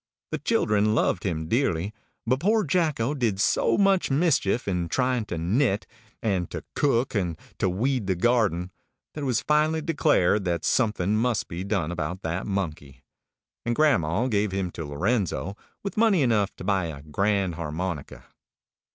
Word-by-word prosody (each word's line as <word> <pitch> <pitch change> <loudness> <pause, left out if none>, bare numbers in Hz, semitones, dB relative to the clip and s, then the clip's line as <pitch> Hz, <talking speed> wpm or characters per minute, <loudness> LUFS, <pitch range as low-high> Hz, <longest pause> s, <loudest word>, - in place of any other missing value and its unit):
The - - -2
children 105 +1 +2
loved 100 -5 +1
him 80 -4 -2
dearly; 100 - 0 0.3
but 130 +3 +1
poor 215 +6 +2
Jacko 150 -6 +1
did 115 -9 0
so 110 - +2
much 195 -2 +3
mischief 135 - +1
in 90 -3 -1
trying 125 -1 0
to 85 - -4
knit, 100 - +1 0.4
and 95 -6 0
to - - -6
cook, 130 -3 +1
and 90 -7 -1 0.2
to 95 - +2
weed 115 +3 0
the 95 - +1
garden, 95 -4 +1 0.4
that 150 - -6
it - - -2
was 125 -4 0
finally 155 +1 +2
declared 145 - +2
that 85 -2 -1
something 105 -5 +1
must 115 0 0
be 85 +2 -5
done 95 -5 -1
about 90 +2 -4
that 85 +5 -3
monkey; 75 -9 -4 0.6
and 120 0 -1
grandma 115 - +2
gave 105 -5 +1
him 95 -2 -2
to 80 - -6
Lorenzo, 85 - -1 0.3
with 200 -1 -5
money 210 -8 +4
enough 105 -5 +1
to - - -9
buy 95 -2 +1
a 70 -3 -8
grand 95 +4 0
harmonica. 85 -1 -5
100 Hz, 160 wpm, -26 LUFS, 90-130 Hz, 0.6 s, money